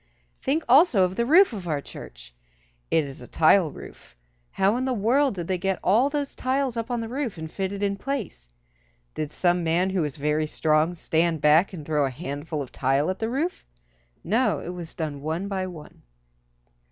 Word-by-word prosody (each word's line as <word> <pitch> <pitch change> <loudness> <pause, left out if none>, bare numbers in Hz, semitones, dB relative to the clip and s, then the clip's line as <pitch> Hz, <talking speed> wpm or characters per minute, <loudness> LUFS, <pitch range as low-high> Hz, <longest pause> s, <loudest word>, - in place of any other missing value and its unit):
Think 305 +4 0
also 255 - +6
of 185 0 0
the 235 +2 0
roof 350 +1 +6
of 190 -5 -6
our 150 -3 0
church. - - -11 0.6
It 160 - +3
is 140 -2 -8
a 125 - -10
tile 165 +1 +4
roof. - - -13 0.3
How 195 +3 +2
in 255 +1 -1
the 260 -1 0
world 245 +4 +2
did 175 -3 -5
they 185 -1 -1
get 190 0 0
all 230 +9 +4
those 285 -1 -3
tiles 260 -1 -1
up 230 +1 -3
on 240 -1 -1
the 225 - -4
roof 250 -4 -3
and 160 0 -7
fitted 195 +1 -3
in 200 0 0
place? 205 - -5 0.6
Did 155 -1 -3
some 175 +2 +1
man 175 +3 +1
who 190 -2 0
was 150 -4 -3
very 150 +2 0
strong 155 +2 +1
stand 165 0 0
back 155 +6 +4
and 165 -6 -8
throw 150 -1 +1
a 135 - +1
handful 145 +2 -5
of 130 - -12
tile 135 +6 +1
at 190 - -7
the 225 - -1
roof? 305 +9 -2 0.6
No, 230 +8 +1
it - - -7
was 175 -2 -7
done 150 -4 -4
one 160 +6 -3
by 190 -2 -2
one. 160 -5 -11
180 Hz, 200 wpm, -25 LUFS, 155-230 Hz, 0.6 s, also